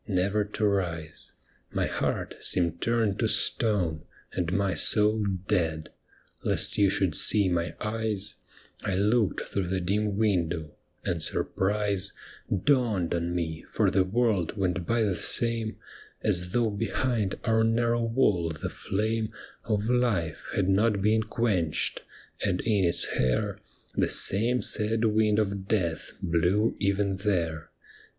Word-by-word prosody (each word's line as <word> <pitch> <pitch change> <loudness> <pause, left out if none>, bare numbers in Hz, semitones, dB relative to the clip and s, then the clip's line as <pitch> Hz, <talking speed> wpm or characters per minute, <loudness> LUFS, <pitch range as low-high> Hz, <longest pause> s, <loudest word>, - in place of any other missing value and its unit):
Never 100 +1 +1
to 105 +1 -2
rise. 85 -6 -2 0.4
My - - 0
heart - - -2
seemed 85 -2 +1
turned 115 -4 +1
to - - +2
stone, 90 -8 +1 0.3
And 90 -2 -1
my 100 -1 +1
soul 105 0 +3 0.2
dead. 80 -3 0 0.5
Lest - - +1
you 100 -1 +4
should 95 -2 +1
see 105 -3 +5
my 85 -1 -1
eyes 105 -2 -3 0.5
I 95 - -1
looked 105 +2 +2
through 100 -3 -3
the 95 +1 -1
dim 100 +3 -1
window, 85 -7 0 0.3
and 85 -2 -1
surprise 100 +4 0 0.4
Dawned 110 - +1
on 85 0 -1
me, 80 -2 -3
for - - +1
the 95 - +3
world 105 -2 0
went 90 -2 -1
by 115 -1 +2
the 100 -3 +1
same 115 +4 -1 0.5
As 90 -4 +1
though 115 -1 +1
behind 110 0 -1
our 110 -1 +2
narrow 115 +1 +2
wall 110 -8 +2
the 80 -2 -5
flame 110 +2 -2 0.3
Of 105 -1 0
life 115 -11 0
had 95 -2 +1
not 100 +1 +2
been 110 +1 +3
quenched, 105 -8 -1 0.4
and 90 -2 0
in 105 -5 +2
its 85 - +3
hair 65 -1 0 0.4
The - - +1
same 120 +5 +2
sad 110 +1 +1
wind 105 -1 +2
of 100 -2 -1
death 85 -8 -1
blew 90 +5 +2
even 100 -1 0
there. 85 -6 -1
100 Hz, 135 wpm, -27 LUFS, 90-110 Hz, 0.5 s, see